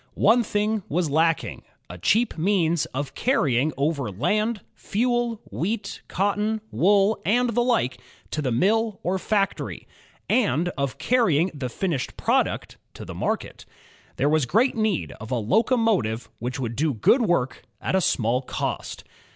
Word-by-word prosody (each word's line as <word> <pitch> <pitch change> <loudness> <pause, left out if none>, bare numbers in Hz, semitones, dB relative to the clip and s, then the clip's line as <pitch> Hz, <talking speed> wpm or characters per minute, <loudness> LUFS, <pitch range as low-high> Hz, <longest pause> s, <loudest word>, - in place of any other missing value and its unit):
One 230 +4 +5
thing 210 0 0
was 165 -1 0
lacking, 165 +1 +1 0.3
a 90 - -9
cheap 225 - +2
means 170 -2 +1
of 135 +1 -5
carrying 155 - +1
over 140 -4 0
land, 210 - 0
fuel, 240 0 -1
wheat, 200 +3 -3
cotton, 210 +3 0
wool, 200 +3 +3
and 240 +6 +2
the 240 +2 +1
like, 235 - 0 0.3
to 155 - -2
the 130 -4 -1
mill 210 - +1
or 185 +2 0
fac 200 0 +1
tory; - - -7 0.4
and 180 - +2
of 140 -6 -3
carrying 190 - +2
the 135 -4 -4
finished 155 -1 -3
product - - 0 0.2
to - - -8
the - - -7
market. - - -3 0.5
There 140 - +1
WEia 150 -3 +2
great 235 - +2
need 215 -6 0
of 110 +3 -8
a - - +1
locomo 225 - +2
tive 110 +1 -4
which 125 +4 -4
would 120 -3 -3
do 150 0 0
good 235 - +4
work 175 - 0 0.2
at - - -2
a 190 - +3
small 125 -5 +1
cost. 130 - -4
185 Hz, 155 wpm, -24 LUFS, 140-220 Hz, 0.5 s, One